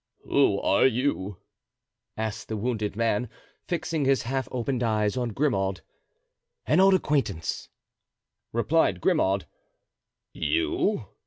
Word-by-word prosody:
"Who - - +3
are - - +4
you?" 115 -7 -1 0.8
asked 110 0 -4
the 110 - -3
wounded 110 -2 -2
man, 115 +1 0 0.4
fixing 160 -3 -1
his 135 0 +2
half 130 +2 -2
opened 125 0 -2
eyes 110 -2 +1
on 125 -2 -1
Grimaud. 95 -7 0 0.8
"An 155 - +3
old 195 0 +6
acquaintance," 130 - -1 0.8
replied 145 +8 +2
Grimaud. - - +1 0.9
"You?" 340 - 0
125 Hz, 105 wpm, -26 LUFS, 110-150 Hz, 0.9 s, old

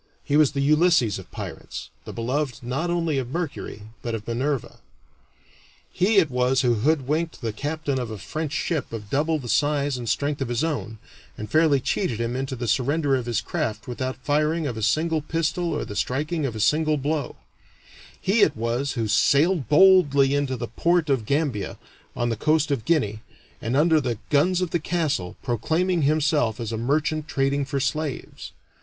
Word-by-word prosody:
He 145 - 0
was 150 -2 +4
the 140 - -1
Ulysses 150 - +3
of 95 - -12
pirates, - - -7
the - - -6
beloved 125 +3 -2
not 135 +8 -2
only 165 -5 0
of 125 -2 -4
Mercury, 145 -8 -4 0.2
but 115 -1 -3
of 110 -1 -7
Minerva. 130 +3 -2 1.1
He 200 +4 +2
it 165 -8 +4
was 125 +1 +2
who 125 -3 +3
hoodwinked 150 +6 0
the 115 -3 -2
captain 145 +2 -2
of 120 -2 -4
a 110 - -6
French 155 +9 -4
ship 160 -3 -2
of 105 -3 -7
double 155 +3 +1
the 130 -5 -7
size 145 0 +1
and 120 -2 -4
strength 145 +4 -1
of 135 - -1
his 120 +2 -1
own, 145 -9 -3 0.4
and 105 0 -7
fairly 155 -3 +4
cheated 130 - -1
him 115 +1 -2
into 135 +1 -3
the 120 -1 -4
surrender 135 +5 +1
of 125 -2 -3
his 115 -3 0
craft 110 0 -3
without 130 +1 -3
the 130 - -30
firing 155 +2 +1
of 125 -5 -2
a 110 - -5
single 160 +7 +1
pistol 165 +3 -1
or 150 - -2
the 105 - -8
striking 150 +7 -1
of 115 - -5
a - - -5
single 155 +6 +2
blow; 145 +1 -2 0.8
he 210 +4 +2
it 150 - +4
was 120 +5 -1
who 115 -3 -1
sailed 140 - +3
boldly 145 -6 +6
into 140 -2 0
the 120 0 -4
port 165 - +1
of 120 -6 0
Gambia, 140 - -1 0.4
on 120 0 0
the 115 - 0
coast 155 +5 +1
of 125 -6 -1
Guinea, 110 -10 +1 0.4
and 120 +4 -1
under 160 +1 +4
the 120 -4 -2
guns 175 +5 +3
of 180 - -1
the 170 - +1
castle, 155 - -1
proclaiming 160 - 0
himself 145 -5 +2
as 115 -1 -4
a 115 - -2
merchant 150 +5 0
trading 140 0 0
for 140 0 -2
slaves. 145 +1 -3
140 Hz, 185 wpm, -24 LUFS, 120-155 Hz, 1.1 s, boldly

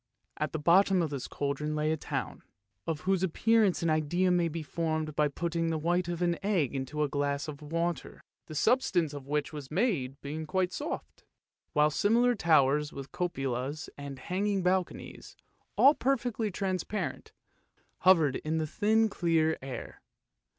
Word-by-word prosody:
At 155 -1 -2
the - - -2
bottom 180 +4 +4
of 155 - -2
this 140 -3 -4
cauldron 145 +2 -2
lay 155 +1 +1
a - - +2
town, 155 - -4 0.5
of 160 -2 -2
whose 190 -1 +1
appearance 205 +1 +2
an 165 - +2
idea 175 +4 +1
may 175 -1 +3
be 165 0 -4
formed 155 -1 -2
by 150 -1 +3
putting 165 +3 -2
the 160 - 0
white 175 +3 0
of 175 0 -2
an 170 -1 +1
egg 180 - +1
into 140 +3 -2
a - - +1
glass 145 +1 -1
of 150 -1 -7
water, 165 +3 -3 0.2
the 155 - -8
substance 175 - +2
of 140 -2 -8
which 150 0 -1
it - - -20
was 145 -3 -7
made 155 - 0
being 155 +2 -5
quite 185 +2 +1
as - - -6
soft, 300 +3 -6 0.5
while 150 -1 +4
similar 235 +9 +3
towers 150 - +3
with 135 -1 -8
cupolas 135 -5 -3
and 140 -1 -7
hanging 195 +4 -1
balconies, 185 0 -2 0.4
all 280 +2 +7
perfectly 245 -6 0
transparent, 190 +1 -3 0.7
hovered 165 -7 +4
in 155 +1 -2
the 160 - 0
thin 220 +7 +2
clear 165 -5 +1
air. 130 -3 -7
160 Hz, 165 wpm, -30 LUFS, 150-185 Hz, 0.7 s, all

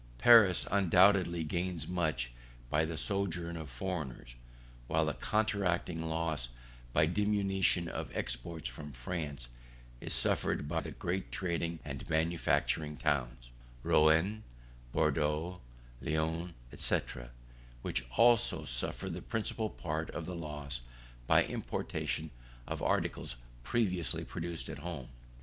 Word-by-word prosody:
Paris 105 - +7
undoubtedly 95 -2 +5
gains 85 0 -1
much 80 -9 0 0.4
by 75 +1 +3
the 80 0 -4
sojourn 90 -4 -1
of 80 -3 -6
foreigners, 65 -3 -4 0.5
while - - +2
the - - 0
counteracting 95 -6 0
loss 80 -5 -1 0.4
by 75 - +4
diminution 95 -1 +2
of - - -4
exports 65 +5 -3
from 75 +4 -7
France 70 0 -4 0.5
is - - -6
suffered 75 - +1
by 80 +2 0
the - - -5
great 90 +2 -3
trading 85 -2 -1
and 70 0 -6
manufacturing 80 -2 +1
towns, 65 -5 -1 0.3
Rouen, 80 +8 +4 0.5
Bordeaux, 75 +8 +1 0.4
Lyons, 80 +3 -1 0.2
&c, - - +2 0.8
which - - 0
also 115 -9 +5
suffer 60 +8 -2
the 90 -1 -4
principal 110 0 -2
part 80 -3 -3
of 85 - -4
the 90 - -5
loss 75 -5 -4 0.5
by - - +6
importation 80 0 -3 0.3
of - - -4
articles - - 0 0.3
previously 90 - 0
produced 85 -1 -5
at - - -6
home. 80 -5 -6
85 Hz, 115 wpm, -33 LUFS, 75-90 Hz, 0.8 s, Paris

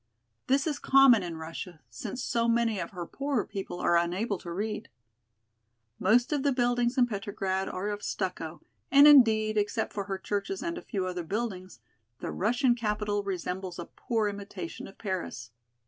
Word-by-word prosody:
This 275 +2 +3
is 300 -3 -1
common 270 -5 +6
in 170 -3 -5
Russia, 165 +1 -7
since 240 +2 -5
so 235 0 +1
many 230 -3 +2
of - - -4
her 180 -5 -6
poorer 275 - -1
people 195 -3 -6
are 170 - +3
unable 180 +4 0
to 170 - -8
read. 210 +4 -3 1.1
Most 240 +8 +3
of 290 - +1
the 285 0 +2
buildings 245 -1 +1
in 250 - +6
Petrograd 195 -3 -2
are 190 +3 -3
of 205 0 -4
stucco, 170 -6 -4 0.3
and 280 +2 +8
indeed, 220 -6 +6
except 210 +2 -1
for 200 -1 -3
her 195 -1 -3
churches 205 - -3
and 340 0 -2
a - - -6
few 195 -5 -3
other 180 -1 -3
buildings, 185 - -4 0.4
the - - -4
Russian 245 +5 +2
capital 210 -3 -1
resembles 185 -1 -4
a 175 - -5
poor 225 +2 -1
imitation 205 - -6
of 195 - -14
Paris. 180 - -4
210 Hz, 170 wpm, -29 LUFS, 185-240 Hz, 1.1 s, and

